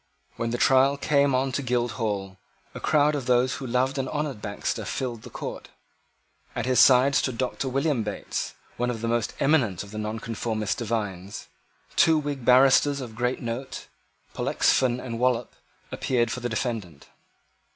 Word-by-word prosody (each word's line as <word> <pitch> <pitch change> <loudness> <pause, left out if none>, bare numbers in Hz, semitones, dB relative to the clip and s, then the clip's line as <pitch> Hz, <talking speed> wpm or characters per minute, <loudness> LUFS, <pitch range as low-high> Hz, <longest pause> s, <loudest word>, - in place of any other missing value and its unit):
When 115 - -2
the 120 - -1
trial 135 +2 +4
came 140 -2 +2
on 135 +1 +1
at 140 +2 -2
Guildhall, 110 -6 -2 0.3
a - - -7
crowd 150 -1 +3
of 140 -4 -3
those 125 +1 +3
who 130 0 -6
loved 130 +3 0
and 130 -1 -2
honoured 150 -7 -3
Baxter 100 0 -3
filled 120 -4 -4
the - - -11
court. - - -7 0.9
At 120 - -2
his 130 -2 +2
side 130 +2 +6
stood 130 -2 +1
Doctor 130 +1 -2
William 135 -1 0
Bates, 105 -2 -4 0.2
one 125 0 0
of 115 -3 -4
the 115 - -2
most 115 -1 -1
eminent 120 - +2
of 100 - -12
the 110 - -5
Nonconformist 110 +1 -3
divines. 105 -4 -4 0.5
Two 160 -1 +5
Whig 145 -3 -3
barristers 135 +3 +5
of 120 -4 -7
great 125 +3 -2
note, 120 +3 -5 0.4
Pollexfen 125 -2 +2
and 115 -2 -5
Wallop, 125 -1 +1 0.4
appeared 120 -3 0
for 125 - -3
the 120 0 -3
defendant. 110 - -4
125 Hz, 160 wpm, -26 LUFS, 115-135 Hz, 0.9 s, side